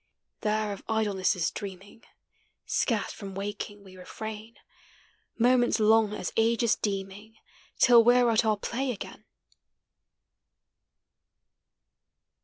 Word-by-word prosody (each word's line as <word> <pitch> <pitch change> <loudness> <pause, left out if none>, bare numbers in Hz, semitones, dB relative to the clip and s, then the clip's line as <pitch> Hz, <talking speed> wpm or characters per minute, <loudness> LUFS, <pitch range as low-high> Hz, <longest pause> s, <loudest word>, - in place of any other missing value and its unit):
There 215 -1 -1
of 195 - -11
idlenesses 200 -6 0
dreaming, 200 +2 -9 0.6
Scarce 225 -5 -1
from 195 -2 -9
waking 205 +1 -6
we 190 -1 -14
refrain, 220 +4 -8 0.8
Moments 245 0 +3
long 220 0 +4
as - - -5
ages 230 0 +2
deeming 200 +2 -5 0.4
Till 240 -2 +6
we? 245 +2 +5
re 240 -2 +3
at 220 - +3
our 215 -1 +1
play 255 +6 -3
again. 240 - -7
215 Hz, 100 wpm, -27 LUFS, 200-230 Hz, 0.8 s, Till